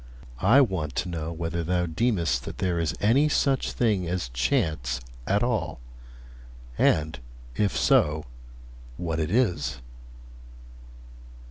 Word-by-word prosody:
I 120 Hz, +9 st, +6 dB
want 95 Hz, -, -1 dB
to 90 Hz, -, -1 dB
know 80 Hz, -1 st, -4 dB
whether 85 Hz, 0 st, -3 dB
thou 90 Hz, +1 st, 0 dB
deemest 85 Hz, -, 0 dB
that -, -, -7 dB
there 90 Hz, -3 st, 0 dB
is 80 Hz, -1 st, -1 dB
any 135 Hz, +9 st, +3 dB
such 135 Hz, -2 st, +1 dB
thing 105 Hz, -7 st, +1 dB
as 85 Hz, -7 st, -2 dB
chance 65 Hz, -, 0 dB, 0.3 s
at 100 Hz, +3 st, +2 dB
all, 120 Hz, -, -1 dB, 1.0 s
and, 80 Hz, +2 st, +2 dB, 0.4 s
if 100 Hz, +4 st, 0 dB
so, 75 Hz, 0 st, +3 dB, 0.7 s
what 80 Hz, -2 st, -2 dB
it 80 Hz, 0 st, -1 dB
is.' 110 Hz, -4 st, +1 dB
85 Hz, 120 wpm, -26 LUFS, 80-105 Hz, 1.0 s, I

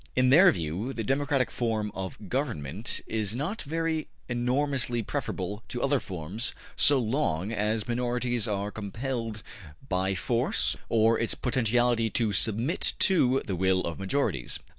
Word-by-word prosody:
In 130 Hz, 0 st, +4 dB
their 175 Hz, +7 st, +8 dB
view, 90 Hz, -, -3 dB
the 115 Hz, -, -3 dB
democratic 135 Hz, +1 st, +1 dB
form 110 Hz, -3 st, -1 dB
of 95 Hz, +2 st, -6 dB
government 110 Hz, -, -2 dB
is 110 Hz, -1 st, -2 dB
not 160 Hz, -, -3 dB
very 160 Hz, +1 st, -2 dB, 0.2 s
enormously 125 Hz, 0 st, 0 dB
preferable 105 Hz, +1 st, -3 dB
to 120 Hz, -, -4 dB
other 140 Hz, 0 st, +3 dB
forms 95 Hz, -, -3 dB, 0.2 s
so 145 Hz, -, +5 dB
long 110 Hz, -, 0 dB
as 110 Hz, 0 st, -1 dB
minorities 120 Hz, -1 st, 0 dB
are 100 Hz, -1 st, -2 dB
compelled 110 Hz, +1 st, -4 dB, 0.4 s
by 95 Hz, -1 st, 0 dB
force 115 Hz, +7 st, 0 dB
or 115 Hz, 0 st, +4 dB
its 115 Hz, -, +2 dB
potentiality 120 Hz, -2 st, +2 dB
to 110 Hz, -1 st, +1 dB
submit 115 Hz, -, +1 dB
to 135 Hz, -9 st, +3 dB
the 95 Hz, -, -2 dB
will 95 Hz, +1 st, +2 dB
of 85 Hz, 0 st, -4 dB
majorities. 95 Hz, -, -1 dB
115 Hz, 140 wpm, -28 LUFS, 105-130 Hz, 0.4 s, their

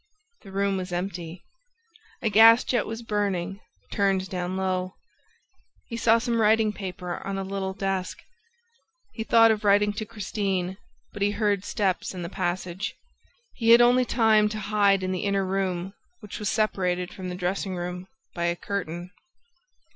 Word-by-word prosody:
The 195 Hz, -, -13 dB
room 195 Hz, 0 st, 0 dB
was 185 Hz, -1 st, -5 dB
empty. 175 Hz, -1 st, -5 dB, 0.8 s
A 225 Hz, -, +2 dB
gas 225 Hz, +3 st, +8 dB
jet 240 Hz, -4 st, 0 dB
was 225 Hz, +1 st, -6 dB
burning, 200 Hz, -3 st, -2 dB, 0.3 s
turned 195 Hz, -2 st, +1 dB
down 180 Hz, 0 st, -3 dB
low. 185 Hz, -1 st, -2 dB, 0.9 s
He 230 Hz, -, -7 dB
saw 230 Hz, 0 st, +4 dB
some 230 Hz, -1 st, 0 dB
writing 215 Hz, 0 st, +3 dB
paper 180 Hz, -3 st, -5 dB
on 195 Hz, 0 st, -3 dB
a 195 Hz, -, -2 dB
little 190 Hz, 0 st, -3 dB
desk. 195 Hz, -2 st, -2 dB, 1.0 s
He 225 Hz, -, -4 dB
thought 225 Hz, 0 st, +6 dB
of 215 Hz, -1 st, -1 dB
writing 205 Hz, 0 st, +4 dB
to 215 Hz, -, -4 dB
Christine, 195 Hz, -4 st, -2 dB, 0.4 s
but 205 Hz, -, -8 dB
he 200 Hz, -, +3 dB
heard 205 Hz, -2 st, 0 dB
steps 195 Hz, -3 st, -1 dB
in 180 Hz, -, -5 dB
the 170 Hz, -, -5 dB
passage. 180 Hz, +2 st, -3 dB, 0.6 s
He 230 Hz, -2 st, -1 dB
had 235 Hz, +1 st, +9 dB
only 245 Hz, +1 st, +5 dB
time 220 Hz, -3 st, +3 dB
to 215 Hz, 0 st, -5 dB
hide 200 Hz, -2 st, +4 dB
in 185 Hz, -, -1 dB
the 185 Hz, -, -2 dB
inner 200 Hz, -1 st, +1 dB
room, 190 Hz, -1 st, -2 dB, 0.3 s
which 210 Hz, -, -8 dB
was 210 Hz, -1 st, -1 dB
separated 180 Hz, -5 st, 0 dB
from 185 Hz, -1 st, -6 dB
the 180 Hz, -, -4 dB
dressing 185 Hz, +1 st, -2 dB
room 180 Hz, +1 st, -5 dB, 0.3 s
by 170 Hz, -1 st, -2 dB
a 170 Hz, 0 st, +1 dB
curtain. 175 Hz, -2 st, -5 dB
195 Hz, 160 wpm, -26 LUFS, 185-215 Hz, 1.0 s, had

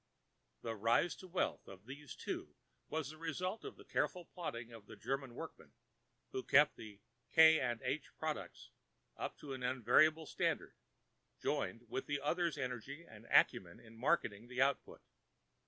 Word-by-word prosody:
The 115 Hz, -1 st, -2 dB
rise 115 Hz, -, +3 dB
to 185 Hz, -, -10 dB
wealth 180 Hz, +1 st, -1 dB
of 95 Hz, +1 st, -11 dB
these 140 Hz, +3 st, -8 dB
two -, -, -5 dB, 0.3 s
was 155 Hz, -2 st, -2 dB
the 155 Hz, -, -13 dB
result 180 Hz, +6 st, -2 dB
of -, -, -7 dB
the -, -, -15 dB
careful 180 Hz, -2 st, -1 dB
plodding 120 Hz, -11 st, -5 dB
of 110 Hz, -3 st, -12 dB
the -, -, -10 dB
German 135 Hz, 0 st, -3 dB
workman, -, -, -8 dB, 0.6 s
who 130 Hz, -, -2 dB
kept 145 Hz, +3 st, +5 dB
the 105 Hz, -2 st, -10 dB, 0.3 s
"K. 160 Hz, 0 st, +8 dB
& 120 Hz, -1 st, -3 dB
H." -, -, -2 dB
products -, -, -4 dB, 0.4 s
up -, -, -4 dB
to 140 Hz, -2 st, -7 dB
an 130 Hz, -, -6 dB
unvarying 155 Hz, +6 st, +4 dB
standard, -, -, -1 dB, 0.7 s
joined 115 Hz, +1 st, -1 dB
with 130 Hz, -, -3 dB
the 145 Hz, -1 st, 0 dB
other's 170 Hz, +3 st, 0 dB
energy 135 Hz, +4 st, -4 dB
and -, -, -13 dB
acumen 85 Hz, -2 st, +4 dB
in 115 Hz, 0 st, -15 dB
marketing 115 Hz, -4 st, +1 dB
the 125 Hz, 0 st, -5 dB
output. 135 Hz, +1 st, +1 dB
135 Hz, 155 wpm, -37 LUFS, 115-160 Hz, 0.7 s, K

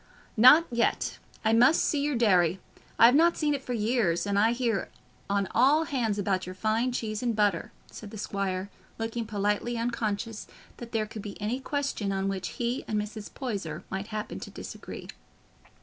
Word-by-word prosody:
"Not 255 Hz, +9 st, +8 dB
yet; 235 Hz, 0 st, 0 dB, 0.3 s
I 220 Hz, -, +4 dB
must 245 Hz, +8 st, +5 dB
see 295 Hz, -, +1 dB
your 290 Hz, -1 st, 0 dB
dairy. 185 Hz, -6 st, +3 dB, 0.4 s
I -, -, +8 dB
have 240 Hz, -, +7 dB
not 335 Hz, +4 st, +4 dB
seen 300 Hz, -2 st, +1 dB
it 280 Hz, -, -2 dB
for 250 Hz, -, -4 dB
years, 215 Hz, -6 st, +1 dB
and 200 Hz, 0 st, +1 dB
I 220 Hz, +2 st, +4 dB
hear 235 Hz, -4 st, -1 dB, 0.4 s
on 200 Hz, -1 st, +1 dB
all 280 Hz, +7 st, +5 dB
hands 240 Hz, -9 st, -1 dB
about 190 Hz, -2 st, -1 dB
your 185 Hz, -, -7 dB
fine 220 Hz, +5 st, 0 dB
cheese 215 Hz, -3 st, -3 dB
and 240 Hz, -3 st, 0 dB
butter," 205 Hz, -5 st, +1 dB, 0.2 s
said 215 Hz, -, -9 dB
the 215 Hz, -, -9 dB
squire, 195 Hz, -1 st, -3 dB, 0.3 s
looking 225 Hz, 0 st, -3 dB
politely 210 Hz, +3 st, -1 dB
unconscious 225 Hz, -2 st, -2 dB, 0.3 s
that 235 Hz, -1 st, -9 dB
there 220 Hz, -2 st, 0 dB
could 215 Hz, 0 st, -8 dB
be 200 Hz, 0 st, -8 dB
any 220 Hz, +5 st, -2 dB
question 275 Hz, -7 st, -2 dB
on 195 Hz, 0 st, -1 dB
which 190 Hz, -2 st, -3 dB
he 240 Hz, +2 st, -1 dB
and 215 Hz, -1 st, 0 dB
Mrs. 210 Hz, 0 st, -6 dB
Poyser 195 Hz, -, -4 dB
might 195 Hz, +2 st, -3 dB
happen 215 Hz, -1 st, -5 dB
to -, -, -8 dB
disagree. -, -, -8 dB
220 Hz, 180 wpm, -28 LUFS, 200-245 Hz, 0.4 s, Not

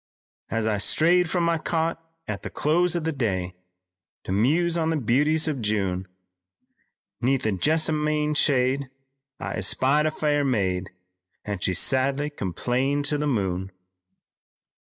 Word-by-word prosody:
"As 115 Hz, -1 st, -1 dB
I 105 Hz, -2 st, 0 dB
strayed 175 Hz, -, +3 dB
from 175 Hz, 0 st, 0 dB
my 170 Hz, -1 st, +1 dB
cot 165 Hz, 0 st, -1 dB, 0.2 s
at 100 Hz, -2 st, -4 dB
the -, -, -6 dB
close 175 Hz, +3 st, +1 dB
of 170 Hz, -, -1 dB
the 160 Hz, -, 0 dB
day 95 Hz, -, -2 dB, 0.7 s
To -, -, -5 dB
muse 155 Hz, -, +2 dB
on 160 Hz, -1 st, 0 dB
the 160 Hz, -, +1 dB
beauties 150 Hz, +6 st, +2 dB
of 145 Hz, -5 st, -2 dB
June, 95 Hz, -4 st, -1 dB, 1.1 s
'Neath 130 Hz, 0 st, +1 dB
a 110 Hz, -, +2 dB
jessamine 150 Hz, -, +1 dB
shade 135 Hz, -2 st, +2 dB, 0.5 s
I -, -, -4 dB
espied 145 Hz, +4 st, +2 dB
a -, -, +3 dB
fair 150 Hz, -1 st, 0 dB
maid 95 Hz, -8 st, 0 dB, 0.6 s
And 100 Hz, -3 st, -4 dB
she 95 Hz, -, +1 dB
sadly 140 Hz, -, +1 dB
complained 130 Hz, -, -1 dB
to 145 Hz, 0 st, 0 dB
the 150 Hz, -, 0 dB
moon." 95 Hz, -7 st, -1 dB
140 Hz, 140 wpm, -25 LUFS, 110-155 Hz, 1.1 s, strayed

